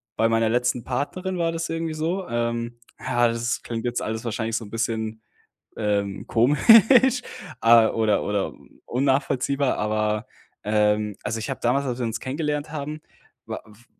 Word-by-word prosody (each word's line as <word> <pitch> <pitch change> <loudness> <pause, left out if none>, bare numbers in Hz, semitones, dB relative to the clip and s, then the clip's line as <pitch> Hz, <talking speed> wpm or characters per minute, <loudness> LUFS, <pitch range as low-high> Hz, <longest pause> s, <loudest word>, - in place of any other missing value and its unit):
bei 115 - +2
meiner 115 0 +2
letzten 125 +1 0
Partnerin 180 - -3
war 165 -1 +1
das 165 0 -4
irgendwie 165 -1 -2
so, 170 +5 -2
ähm 120 0 -2 0.2
ja, 120 0 +2
das 115 +1 -2
klingt 115 0 -5
jetzt 120 0 -1
alles 110 +2 -4
wahrscheinlich 115 0 -2
so 115 - -6
'n 100 - -13
bisschen, 110 -1 -2 0.6
ähm, 100 -2 -1
komisch, 225 - +6 0.4
ah, 115 -1 +6
oder 110 -3 +1
oder 100 -1 -2 0.3
unnachvollziehbar, 135 +1 +1
aber, 105 +1 -1 0.4
ähm 105 -1 +1
also, 110 +1 -2
ich 110 - -4
habe 135 - -3
damals, 130 +4 +1
als 125 -1 -3
wir 120 - -1
uns 115 0 -3
kennengelernt 150 +2 -3
haben, 150 0 -5 0.5
wa - - -4
f 110 +2 -19
120 Hz, 160 wpm, -24 LUFS, 110-145 Hz, 0.6 s, komisch